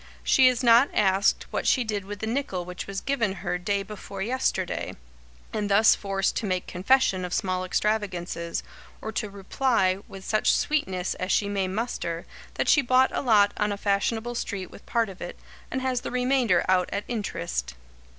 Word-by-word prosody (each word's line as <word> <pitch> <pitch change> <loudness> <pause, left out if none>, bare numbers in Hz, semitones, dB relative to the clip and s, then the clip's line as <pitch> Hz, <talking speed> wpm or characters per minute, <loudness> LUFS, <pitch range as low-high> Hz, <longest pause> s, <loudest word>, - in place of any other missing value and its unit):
She 260 -1 +5
is 255 0 +2
not 235 +3 +6
asked 195 -1 +3
what - - -2
she 255 - +4
did 210 -4 -3
with 205 0 -7
the - - -1
nickel 220 -7 -2
which 180 0 -7
was 195 0 -4
given 235 -8 0
her 180 0 -1
day 200 +2 -1
before 195 -1 -7
yesterday, 255 +5 -1 0.6
and 210 -1 -1
thus 210 +3 +6
forced 195 -1 -1
to 215 - -2
make 185 -1 -1
confession 190 0 +2
of 180 0 -2
small 185 -1 -1
extravagances, 185 -4 -2 0.4
or 220 - -5
to 215 -1 -3
reply, 200 -1 +1
with 195 -1 -10
such 215 - +2
sweetness 190 -12 0
as 185 +1 -3
she 205 - +2
may 200 -2 -1
muster, 185 -5 -3 0.3
that - - -1
she 290 - +6
bought 255 0 +3
a - - 0
lot 210 -5 +4
on 210 -1 +1
a 200 - -2
fashionable 220 +4 0
street 200 -5 -4
with - - -14
part 230 -1 +1
of 190 -2 -11
it, 175 - -6 0.3
and 260 0 -3
has 255 -2 0
the - - -5
remainder 250 -7 +2
out 185 -1 +2
at 205 - -2
interest. 65 - -3
205 Hz, 185 wpm, -26 LUFS, 185-235 Hz, 0.6 s, not